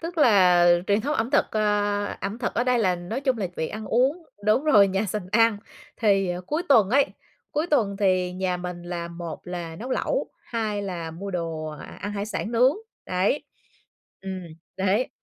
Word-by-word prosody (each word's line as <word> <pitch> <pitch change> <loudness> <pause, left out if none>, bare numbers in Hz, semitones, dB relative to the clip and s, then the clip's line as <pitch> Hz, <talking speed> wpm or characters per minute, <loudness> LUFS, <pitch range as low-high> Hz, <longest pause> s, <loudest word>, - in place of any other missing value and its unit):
tức 335 +1 -5
là 185 - +6 0.2
truyền 205 +1 +3
thống 290 +7 -1
ẩm 225 -1 -1
thực, 285 - +3
ơ, 205 -1 +1 0.2
ẩm 200 +4 -4
thực 245 - -2
ở 240 - +1
đây 250 -1 +2
là 190 -5 +2
nói 180 +9 -4
chung 260 -4 0
là 195 - -1
việc 160 - -2
ăn 215 0 -6
uống 270 +9 +2 0.2
đúng 215 +8 +3
rồi, 205 -10 +6
nhà 195 +3 0
sành 205 -1 -3
ăn. 225 -1 +4 0.4
Thì 195 -4 +2 0.2
cuối 310 +3 -1
tuần 220 -8 +5
ấy, 275 +3 +4 0.5
cuối 305 +3 0
tuần 220 - +1
thì 185 -3 +2
nhà 185 0 -1
mình 180 -1 -6
là 175 -1 -5
một 170 -1 -7
là 175 -2 -5
nấu 245 +7 -7
lẩu, - - 0 0.2
hai 215 -3 -2
là 175 -4 -4
mua 190 +5 -6
đồ 165 -3 -3 0.4
ăn 205 - -4
hải 205 0 -3
sản 220 +1 -4
nướng, 250 +5 +4 0.3
đấy, 185 +9 +1 0.8
ừm, 190 -1 -5 0.3
đấy,. 195 +6 +1
205 Hz, 190 wpm, -25 LUFS, 180-235 Hz, 0.8 s, là